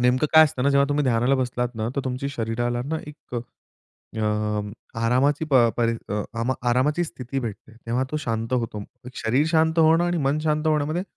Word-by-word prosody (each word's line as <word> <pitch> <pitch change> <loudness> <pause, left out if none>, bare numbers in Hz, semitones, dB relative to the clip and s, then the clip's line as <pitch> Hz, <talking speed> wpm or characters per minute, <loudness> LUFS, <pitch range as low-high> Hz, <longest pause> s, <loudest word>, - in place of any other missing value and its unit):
नेमकं 125 +4 +3
काय 160 0 +10
असतं 130 -4 -2
ना, 140 - +3
जेव्हा 140 0 +4
तुम्ही 145 0 +1
ध्यानाला 125 +1 +2
बसलात 125 -2 -1
ना 110 0 -2
तर - - +2
तुमची 130 +1 -3
शरीराला 120 -1 -2
ना 160 +3 -2
एक 150 -4 -11 0.6
अ, 110 - -10 0.8
आरामाची 130 +6 +2 0.3
परी 115 -1 +2 0.8
आरामाची 145 +8 +2
स्थिती 135 -4 -5
भेटते. 110 -2 -7
तेव्हा 120 +3 0
तो 155 - -2
शांत 115 -4 -3
होतो. 115 -4 -1 0.3
शरीर 130 +7 +1
शांत 160 0 +2
होणं 165 +1 +5
आणि 175 0 0
मन 140 +2 +1
शांत 155 0 0
होण्यामध्ये 155 +2 +1
130 Hz, 165 wpm, -24 LUFS, 120-150 Hz, 0.8 s, काय